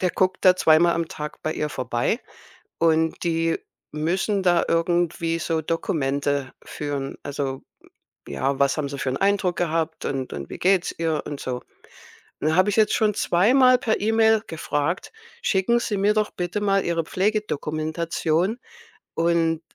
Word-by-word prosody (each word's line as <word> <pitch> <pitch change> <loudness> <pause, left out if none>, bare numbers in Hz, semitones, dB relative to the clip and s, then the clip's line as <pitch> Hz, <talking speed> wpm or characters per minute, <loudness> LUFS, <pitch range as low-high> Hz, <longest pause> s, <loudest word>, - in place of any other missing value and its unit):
der 180 -2 +1
guckt 185 +1 0
da 185 -1 +7
zweimal 170 0 +4
am 165 -1 -1
Tag 150 0 -7
bei 155 - 0
ihr 150 - -2
vorbei. 125 - -1 0.6
Und 160 -1 +2
die 165 0 +1 0.4
müssen 185 +6 0
da 175 -2 +3
irgendwie 165 0 +1
so 165 0 -1
Dokumente 140 -3 -1
führen. 145 -2 -4
Also, 140 -2 -4 0.7
hm, - - -7
ja, 135 - -1
was 140 +1 +2
haben 150 -2 -1
sie 140 - -6
für 135 - -1
'n 130 - -2
Eindruck 195 -3 +1
gehabt 165 -1 -1
und 135 -2 -3
und 70 -1 -6
wie - - -8
geht's 190 -1 +2
ihr 160 -2 0
und 145 - -6
so. 125 -1 -3 0.8
Und 155 - 0
da 160 - +1
habe 185 +3 +4
ich 200 - 0
jetzt 215 -1 +4
schon 215 -1 +2
zweimal 255 +9 +4
per 220 -3 0
E-Mail 220 0 +3
gefragt: 160 +2 -2 0.3
„Schicken 215 - +2
Sie 215 -3 -2
mir 200 +2 +3
doch 215 0 +1
bitte 180 +4 -3
mal 195 -1 +2
Ihre 170 -1 0
Pflegedokumentation. 170 - -1 0.6
Und 165 -1 +1
165 Hz, 160 wpm, -23 LUFS, 150-195 Hz, 0.8 s, da